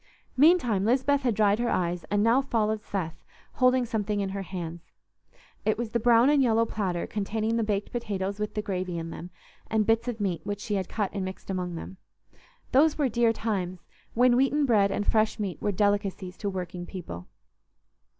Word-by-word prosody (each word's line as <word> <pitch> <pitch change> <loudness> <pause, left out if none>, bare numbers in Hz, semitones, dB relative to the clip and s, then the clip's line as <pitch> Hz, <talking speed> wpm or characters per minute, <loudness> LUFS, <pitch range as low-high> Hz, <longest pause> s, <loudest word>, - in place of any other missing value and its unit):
Meantime 260 - +4
Lisbeth 265 +5 +2
had 245 -5 +1
dried 210 0 +3
her 240 0 0
eyes, 175 -2 -1
and 205 +4 +1
now 235 +4 +4
followed 220 -5 0
Seth, 175 -7 -5 0.3
holding 255 -1 +3
something 210 -2 -1
in 195 -1 -1
her 195 +1 -4
hands. 170 -2 -6 0.8
It 215 - +1
was 230 -1 -3
the 235 - +1
brown 235 +1 +5
and 290 -1 +4
yellow 230 -2 +3
platter 190 -6 -2
containing 220 +2 -2
the 230 - +1
baked 205 -1 -2
potatoes 200 -4 -3
with 210 0 -3
the 210 - -1
gravy 185 -3 -3
in 165 0 -5
them 175 - -8 0.4
and 220 -1 +2
bits 225 +2 +2
of 235 -2 -3
meat 185 -6 -1
which 205 0 -4
she 210 - -4
had 190 -3 -1
cut 205 -4 -2
and 200 -2 -2
mixed 190 +1 -6
among 180 -2 -3
them. 190 +3 -8 0.7
Those 295 +4 +4
were 285 -4 +2
dear 235 0 +3
times, 190 -6 -3 0.3
when 245 +1 +5
wheaten 270 +3 +3
bread 210 -6 +4
and 205 +1 -2
fresh 215 0 +2
meat 190 -7 -4
were 205 - +1
delicacies 200 -2 0
to 205 - -2
working 180 -2 -5
people. 90 - -8
210 Hz, 190 wpm, -27 LUFS, 190-235 Hz, 0.8 s, brown